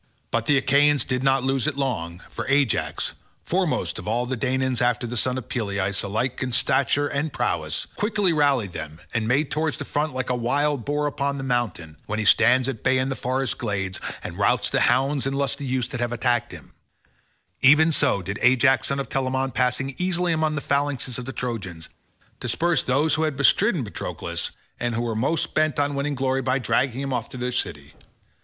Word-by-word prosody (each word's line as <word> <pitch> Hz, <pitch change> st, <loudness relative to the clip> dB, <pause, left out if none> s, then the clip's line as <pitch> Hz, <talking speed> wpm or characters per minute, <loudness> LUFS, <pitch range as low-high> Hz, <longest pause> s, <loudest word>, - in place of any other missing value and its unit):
But 115 Hz, 0 st, -1 dB
the 145 Hz, -, +4 dB
Achaeans 140 Hz, +2 st, +3 dB
did 125 Hz, -1 st, -1 dB
not 135 Hz, -1 st, +2 dB
lose 135 Hz, +1 st, +1 dB
it 150 Hz, -3 st, -1 dB
long, 90 Hz, -11 st, -3 dB
for -, -, -5 dB
Ajax, 135 Hz, -4 st, +1 dB, 0.3 s
foremost -, -, -1 dB
of -, -, -9 dB
all 120 Hz, +3 st, 0 dB
the 130 Hz, +1 st, -2 dB
Danaans 130 Hz, 0 st, 0 dB
after 120 Hz, 0 st, +1 dB
the 120 Hz, +1 st, -4 dB
son 125 Hz, +2 st, +1 dB
of 125 Hz, -, -6 dB
Peleus 100 Hz, -4 st, -1 dB
alike 110 Hz, +6 st, -2 dB
in 130 Hz, -1 st, -2 dB
stature 140 Hz, +4 st, +3 dB
and 145 Hz, +2 st, -2 dB
prowess, -, -, -1 dB
quickly 205 Hz, -4 st, +1 dB
rallied 140 Hz, -, +2 dB
them 80 Hz, -1 st, -7 dB
and 115 Hz, -2 st, 0 dB
made 140 Hz, +5 st, +1 dB
towards 155 Hz, 0 st, -1 dB
the -, -, -5 dB
front 150 Hz, -1 st, -2 dB
like 130 Hz, -1 st, -2 dB
a -, -, +1 dB
wild 140 Hz, +2 st, 0 dB
boar 145 Hz, +1 st, 0 dB
upon 140 Hz, -1 st, -1 dB
the 135 Hz, -, -5 dB
mountains 115 Hz, -11 st, -2 dB
when 105 Hz, -, -2 dB
he 110 Hz, -, -1 dB
stands 120 Hz, +5 st, +5 dB
at 130 Hz, -5 st, -4 dB
bay 130 Hz, 0 st, +3 dB
in 130 Hz, +1 st, 0 dB
the 135 Hz, -, -2 dB
forest 130 Hz, -1 st, -1 dB
glades 95 Hz, -4 st, -2 dB, 0.2 s
and -, -, -7 dB
routs -, -, +2 dB
the -, -, +2 dB
hounds 135 Hz, +1 st, +2 dB
and 135 Hz, 0 st, -2 dB
lusty 140 Hz, 0 st, -1 dB
youths 125 Hz, -2 st, -1 dB
that 125 Hz, -, -4 dB
have 120 Hz, 0 st, -1 dB
attacked 120 Hz, 0 st, 0 dB
him—even 150 Hz, +4 st, -1 dB
so 140 Hz, -10 st, +2 dB
did 100 Hz, +3 st, -4 dB
Ajax 130 Hz, +1 st, +4 dB
son 140 Hz, -, -1 dB
of 135 Hz, -, -3 dB
Telamon 130 Hz, 0 st, -1 dB
passing 130 Hz, +2 st, 0 dB
easily 180 Hz, -1 st, +1 dB
in 160 Hz, -, +1 dB
among 155 Hz, -1 st, +1 dB
the 145 Hz, -, -2 dB
phalanxes 140 Hz, -4 st, -1 dB
of 125 Hz, -, -6 dB
the 130 Hz, -, -4 dB
Trojans, 95 Hz, -11 st, -4 dB, 0.5 s
disperse 165 Hz, +7 st, +1 dB
those 140 Hz, +5 st, +1 dB
who 155 Hz, -, +1 dB
had 155 Hz, -4 st, -1 dB
bestridden 170 Hz, -, +3 dB
Patroclus 105 Hz, -, -4 dB, 0.3 s
and 120 Hz, -1 st, -1 dB
were 120 Hz, -1 st, -1 dB
most 135 Hz, +9 st, 0 dB
bent 155 Hz, -1 st, +1 dB
on 145 Hz, 0 st, +1 dB
winning 140 Hz, +1 st, -2 dB
glory 135 Hz, 0 st, 0 dB
by 130 Hz, +1 st, +1 dB
dragging 130 Hz, +1 st, 0 dB
him 135 Hz, -1 st, -3 dB
off 120 Hz, -2 st, -2 dB
to -, -, -7 dB
their 125 Hz, 0 st, -2 dB
city. 75 Hz, -, -3 dB
130 Hz, 200 wpm, -24 LUFS, 120-140 Hz, 0.5 s, stands